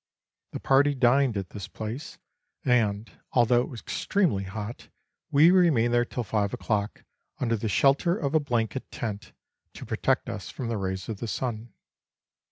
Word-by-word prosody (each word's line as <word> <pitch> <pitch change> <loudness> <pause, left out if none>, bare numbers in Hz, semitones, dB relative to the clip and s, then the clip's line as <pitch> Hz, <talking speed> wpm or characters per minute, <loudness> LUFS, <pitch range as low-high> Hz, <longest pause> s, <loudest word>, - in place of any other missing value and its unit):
The - - -4
party 140 +1 +3
dined 125 -2 +3
at 95 -2 -5
this 100 -3 -7
place, 115 +8 -6 0.5
and, 110 -4 +2 0.3
although 120 0 +4
it - - -4
was 120 - -8
extremely 165 - 0
hot, 105 +4 -7 0.4
we 155 +5 +6
remained 155 -11 +4
there 120 0 +3
till 125 - -4
five 100 -1 -1
o'clock, 105 -1 -2 0.4
under 115 -2 +1
the 110 0 -3
shelter 140 - +3
of 140 -5 -2
a 155 - +5
blanket 120 -3 -2
tent, 105 -3 -5 0.4
to - - -8
protect - - 0
us - - -6
from 120 -3 -5
the 115 - -1
rays 95 -1 -3
of 110 -3 -5
the 115 - -4
sun. 115 -1 -4
120 Hz, 165 wpm, -27 LUFS, 105-135 Hz, 0.5 s, we